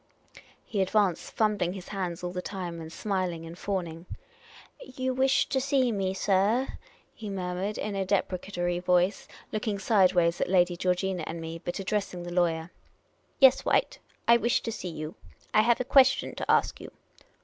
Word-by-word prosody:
He 205 - -1
advanced, 190 -2 +1
fumbling 205 -5 +1
his 190 -2 -9
hands 180 -3 -4
all 180 - -3
the 180 0 -4
time, 180 -4 -5
and 160 0 -8
smiling 180 -4 -2
and 165 +1 -9
fawning. 175 -3 -4 0.4
" - - -21 0.2
You 260 0 0
wished 265 +1 +2
to 265 - +1
see 265 -2 +2
me, 190 -3 -1
sir? 205 +7 +2 0.2
" - - -33
he 215 - -8
murmured, 190 +1 -3
in 210 - -3
a 195 -1 -1
deprecatory 185 -2 -1
voice, 180 +2 +1 0.2
looking 215 -1 -2
sideways 185 -5 +3
at - - 0
Lady 180 -1 +3
Georgina 180 0 -1
and 165 +1 -5
me, 165 0 -6
but 175 +1 -4
addressing 195 -2 -2
the 175 0 -6
lawyer, 170 -1 0 0.3
*' - - -41
Yes, 265 -1 +6
White, - - +1 0.3
I 235 0 +7
wished 235 0 0
to 230 - -2
see 185 - -5
you. 155 0 -6 0.4
I 215 - +6
have 235 +2 +3
a - - 0
question 265 0 +4
to - - -6
ask - - +2
you. - - -9
190 Hz, 180 wpm, -28 LUFS, 175-210 Hz, 0.4 s, I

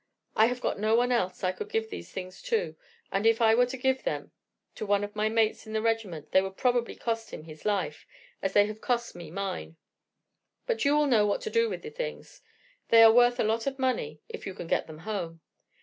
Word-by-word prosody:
I 220 +1 +6
have 250 +1 -3
got - - -1
no 215 +2 +3
one 245 +1 +2
else 185 -7 0
I 185 - +2
could 425 - -7
give 445 0 -2
the - - -5
things 185 0 -8
to, 455 0 0 0.4
and 200 +3 +1
if 225 0 +4
I 225 -1 +5
were 245 +2 +4
to 265 +2 -5
give 265 +1 +1
them - - -3 0.4
to - - -6
one 205 -1 +2
of 205 +1 -6
my 215 +1 +1
mates 220 -1 +1
in 220 - -7
the 220 - 0
regiment 220 -9 -2
they 190 - +5
would 190 0 -6
probably 245 -2 +1
cost 225 -1 -3
him - - -8
his 155 -1 -12
life, 200 -7 -1 0.3
as 195 0 -1
they 205 0 +6
have 215 +1 -7
cost 240 -2 -1
me 170 -2 -9
mine. 190 -2 -4 0.9
But 475 -10 -1
you 290 +1 +4
will 300 - +4
know 225 -7 +4
what 205 - 0
to 440 - -4
do 460 0 +3
with - - -5
the 450 - -7
things; - - -6 0.5
they 230 0 +8
are 225 0 +8
worth 245 +1 +5
a - - +3
lot 225 +3 0
of 270 -1 -2
money 225 - -1
if - - -8
you 190 - -6
can - - -7
get - - 0
them 155 0 -10
home. 175 -6 -4
225 Hz, 240 wpm, -28 LUFS, 195-250 Hz, 0.9 s, they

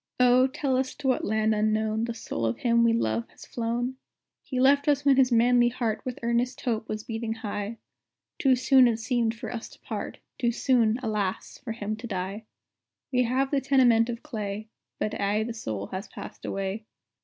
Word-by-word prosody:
O, 250 +1 +6
tell 275 -2 -1
us 260 0 -1
to 285 -2 -4
what 260 - +2
land 220 0 +2
unknown 215 +1 +1
The 235 -1 -4
soul 115 - -3
of 115 - -1
him 235 -1 +3
we 230 - +4
love 115 - 0
has - - -14
flown? 240 +2 -2 0.4
He 255 - -4
left 280 +3 +4
us 285 -1 +2
when 280 -1 +6
his 260 -1 +4
manly 240 +1 +5
heart 235 -3 -2
With 255 -2 -5
earnest 235 +2 0
hope 225 -3 -2
was 215 0 -3
beating 225 0 -3
high; 210 0 -5 0.6
Too 265 -2 +4
soon 255 0 +5
it 230 -2 +1
seemed 230 0 0
for 230 - -6
us 230 - -6
to - - -17
part; - - -5 0.2
Too 240 -2 +2
soon, 235 -2 +2
alas! 210 -4 -2
for 235 -3 -5
him 215 -1 -3
to 235 +2 -7
die. 195 +2 -4 0.7
We 250 -1 +3
have 265 +3 0
the 280 -2 +2
tenement 250 -4 +4
of 235 0 -5
clay, 210 -1 -5 0.3
But 210 - -2
aye 205 +2 +1
the 235 +1 -4
soul 110 - -4
has 190 +2 -4
passed - - -10
away. 195 +3 -3
230 Hz, 195 wpm, -27 LUFS, 215-250 Hz, 0.7 s, O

